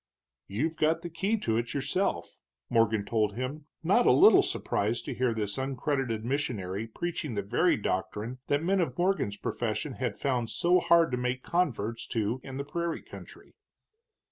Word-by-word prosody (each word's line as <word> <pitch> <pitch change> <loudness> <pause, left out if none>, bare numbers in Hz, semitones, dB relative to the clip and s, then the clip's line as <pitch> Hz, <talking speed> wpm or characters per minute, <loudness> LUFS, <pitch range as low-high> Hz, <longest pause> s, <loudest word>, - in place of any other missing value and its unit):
"You've 150 +11 -2
got 160 +2 +2
the 175 - -6
key 195 +7 0
to 110 -1 +1
it 120 +3 -2
yourself," 135 - -1 0.3
Morgan 110 -3 +3
told 105 -1 0
him, 140 +5 -5 0.2
not 200 +9 +4
a - - +8
little 405 +5 +7
surprised 110 +4 -1
to - - -3
hear 125 -1 +1
this 105 -2 -2
uncredited 130 -4 -1
missionary 115 -7 -2
preaching 150 0 -4
the 100 - -1
very 100 - +2
doctrine 105 +6 -3
that 145 +2 +1
men 190 +3 +2
of 170 - -2
Morgan's 175 - +1
profession 120 +7 -2
had 120 -4 -3
found 125 -4 -1
so 175 +1 +3
hard 170 -2 +4
to 125 - 0
make 125 +1 -2
converts 115 - -1
to 115 +2 -1
in 135 -1 -7
the 140 - -3
prairie 170 +2 -3
country. - - -12
130 Hz, 170 wpm, -29 LUFS, 110-160 Hz, 0.3 s, a